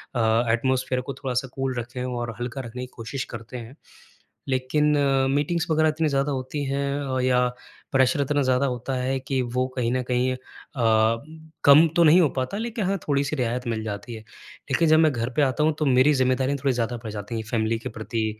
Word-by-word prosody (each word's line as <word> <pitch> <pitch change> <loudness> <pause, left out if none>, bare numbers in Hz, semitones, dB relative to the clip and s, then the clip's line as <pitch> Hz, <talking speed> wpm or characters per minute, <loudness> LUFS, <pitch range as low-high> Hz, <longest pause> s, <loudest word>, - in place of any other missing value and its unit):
अ, 115 0 +3
atmosphere 130 +1 0
को 135 +2 -6
थोड़ा 135 -2 -4
सा 130 +2 0
कूल 135 -1 -2
रखें 120 +2 -5
और 120 -3 -4
हल्का 125 +2 -4
रखने 125 0 -7
की - - -6
कोशिश 125 +3 -4
करते 115 +2 -7
हैं। 120 +2 -9 0.7
लेकिन 140 +3 +1
अ, 135 -2 +2
मीटिंग्स 155 +5 0
वग़ैरह 155 0 +3
इतनी 155 +1 0
ज़्यादा 140 +1 0
होती 135 +2 -3
हैं 140 +1 -1 0.3
अ, - - 0
या 125 -1 +3 0.5
प्रेसर 135 +3 +3
इतना 145 +1 +1
ज़्यादा 130 +1 +2
होता 125 +1 -3
है 130 +1 -1
कि 135 0 -2
वो 125 +1 -1
कहीं 120 -2 0
न 130 0 0
कहीं 125 +1 0
अ, - - -12 1.3
कम 150 +4 +8
तो 170 - +6
नहीं 165 +4 +7
हो 155 - +3
पाता 130 +10 -2
लेकिन 225 -2 -3
हाँ, 195 +1 0
थोड़ी-सी 140 +1 0
रियायत 125 -1 -2
मिल 110 -1 -2
जाती 110 +2 -6
है। 110 - -9 0.5
लेकिन 165 - +3
जब 155 0 +6
मैं 160 -1 +5
घर 120 -2 -2
पे - - +4
आता 140 +1 +1
हूँ 155 +1 +3
तो 155 - +1
मेरी 130 +2 +4
ज़िम्मेदारी 130 +1 +1
थोड़ी 135 -2 +2
ज़्यादा 120 0 -2
बढ़ 110 - -5
जाती 105 +2 -5
है 110 - -3
फ़ैमिली 115 0 0
के - - -6
प्रति 110 0 -3
130 Hz, 210 wpm, -24 LUFS, 120-140 Hz, 1.3 s, कम